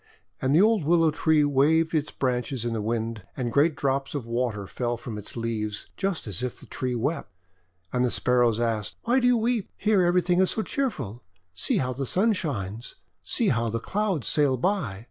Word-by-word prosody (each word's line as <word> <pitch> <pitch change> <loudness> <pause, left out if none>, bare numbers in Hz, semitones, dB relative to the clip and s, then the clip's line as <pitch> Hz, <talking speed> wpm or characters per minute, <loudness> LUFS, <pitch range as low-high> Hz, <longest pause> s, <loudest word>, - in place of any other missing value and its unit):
And 135 +2 +2
the 170 - +6
old 220 -4 +3
Willow 165 +1 +4
Tree 155 0 +3
waved 150 +4 +3
its 150 -2 0
branches 125 -1 -2
in 120 - -1
the 110 - -2
Wind, 115 0 -2 0.2
and 120 -3 -2
great 150 +2 +3
drops 135 +1 -1
of 140 -5 -3
water 115 -3 -2
fell 120 +4 -3
from 115 -1 -7
its 105 -1 -7
green 115 - -5
leaves, 105 -3 -3
just 195 -4 -2
as 100 -3 -2
if 125 -1 -4
the - - -12
tree 125 -1 -3
wept. 140 +7 -2 0.6
And 125 0 +2
the 125 - +2
Sparrows 120 -2 +2
asked: 115 -3 -1
"Why 245 +3 +3
do 245 - +2
you 245 -1 +4
weep? 230 -2 0
Here 210 -2 +3
everything 175 0 +2
is 190 - +3
so 220 - -1
cheerful! 140 - -3 0.3
See 90 - +1
how 130 -1 0
the 135 +1 -3
Sun 215 - +2
shines. 115 - -4 0.3
See - - +1
how 115 0 +1
the 115 +1 -2
Clouds 195 - -1
sail 145 -4 +3
by. 140 - -1
135 Hz, 205 wpm, -26 LUFS, 115-175 Hz, 0.6 s, the